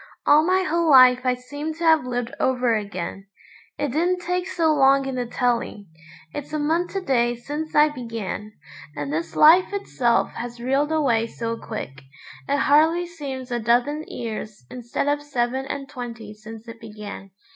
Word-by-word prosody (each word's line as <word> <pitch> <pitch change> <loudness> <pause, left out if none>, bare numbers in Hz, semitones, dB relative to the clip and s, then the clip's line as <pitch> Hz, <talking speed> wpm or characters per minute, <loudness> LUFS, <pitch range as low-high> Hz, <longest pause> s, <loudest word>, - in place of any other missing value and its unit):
All 300 +1 +6
my 370 +2 +2
whole 335 -1 +1
life 255 -2 +8
I 250 - +3
seem 290 +5 -6
to 335 - -7
have 320 -4 +4
lived 245 -1 -3
over 250 -2 +2
again. 195 -2 -5 0.5
It 290 - -1
didn't 355 +5 0
take 360 +1 -1
so 325 -4 +1
long 275 -1 +4
in 270 - -3
the 250 -1 -3
telling; 235 -6 -1 0.4
it's 290 - -6
a - - 0
month 325 +4 0
to 390 - -2
day 240 -7 +1
since 295 +6 -6
I 300 +1 +6
began. 225 -6 -6 0.4
And 145 0 -4
this 165 +1 -3
life 335 +6 +6
itself 245 -12 0
has 240 0 -7
reeled 270 +5 0
away 245 -8 +2
so 230 0 -4
quick, 140 -13 -7 0.5
it 285 - +2
hardly 320 +5 +4
seems 275 -7 -7
a 240 - 0
dozen 245 +7 +1
years 215 - -6
instead 245 +2 -3
of 290 0 +1
seven 265 -2 -2
and 275 0 -5
twenty 235 -6 -8
since 215 +2 -11
it 230 0 -10
began. 210 -3 -9
255 Hz, 170 wpm, -23 LUFS, 230-300 Hz, 0.5 s, life